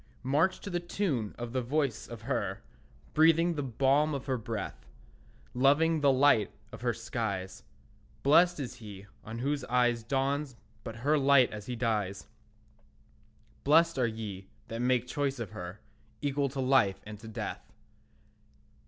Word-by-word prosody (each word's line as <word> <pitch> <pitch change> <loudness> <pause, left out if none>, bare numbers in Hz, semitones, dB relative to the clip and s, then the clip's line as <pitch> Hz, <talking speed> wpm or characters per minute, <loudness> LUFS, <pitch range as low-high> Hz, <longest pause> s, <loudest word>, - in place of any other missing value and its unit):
March 155 +8 +2
to 200 - -7
the 175 - 0
tune 170 - -2
of 120 0 -6
the 130 - 0
voice 135 -1 -1
of 115 -2 -9
her, 100 -6 -2 0.5
Breathing 165 +2 +5
the 150 - -2
balm 140 +4 +2
of 135 - -5
her 135 -2 0
breath, 110 -3 -5 0.7
Loving 145 +5 +3
the 140 -1 +5
light 130 -5 +4 0.2
of - - -10
her 120 -1 +1
skies. 110 -5 -4 0.6
Blessed 170 +4 +5
is 130 -3 -4
he 100 -4 -10 0.2
on 110 +1 -7
whose 140 +3 -1
eyes 120 -1 +2
Dawns 135 +3 -1 0.3
but 115 -2 -6
her 150 +1 +4
light 135 -2 +5
as 105 -1 -8
he 125 - -3
dies; 105 -5 -1 1.4
Blessed 165 +1 +4
are 120 - +3
ye 105 -4 -6 0.2
that 115 +1 -4
make 125 -1 +2
choice 140 +1 -1
of 115 -6 -5
her, 90 +4 -8 0.4
Equal 140 -1 0
to 135 +1 -6
life 130 -7 +3
and 105 -1 -8
to 110 - -11
death. 110 - -6
125 Hz, 155 wpm, -30 LUFS, 110-145 Hz, 1.4 s, Breathing